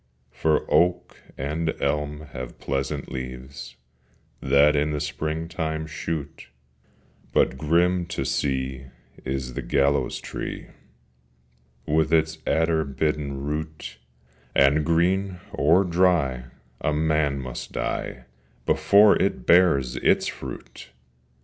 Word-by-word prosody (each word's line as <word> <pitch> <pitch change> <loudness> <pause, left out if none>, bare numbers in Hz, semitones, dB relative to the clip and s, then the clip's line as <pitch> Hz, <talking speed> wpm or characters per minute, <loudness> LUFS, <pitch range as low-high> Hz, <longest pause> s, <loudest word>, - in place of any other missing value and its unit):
For 75 +4 +1
oak 90 0 +1 0.2
and 80 +4 -2
elm 75 0 -1
have 65 -1 -7
pleasant 70 +1 -3
leaves 65 0 -7 0.7
That 70 +2 +4
in 75 +1 +1
the 75 - -1
springtime 80 +1 -3
shoot: 75 -1 -5 0.8
But - - +2
grim 85 +5 +2
to 70 -5 -3
see 65 -1 -2 0.4
is 65 -1 -3
the - - -4
gallows 70 0 +1
tree, - - -6 1.2
With 80 +2 +1
its 80 -1 +2
adder 80 0 +2
bitten 70 -1 -2
root, 75 -4 -5 0.6
And, 70 +3 +4
green 90 +4 +1
or 85 +7 +4
dry, 85 -8 +2 0.3
a 75 - 0
man 75 -2 +1
must 65 -2 -6
die - - -3 0.4
Before 105 +1 +5
it 80 -10 0
bears 70 -9 +4
its - - +3
fruit! - - -7
75 Hz, 105 wpm, -24 LUFS, 70-80 Hz, 1.2 s, Before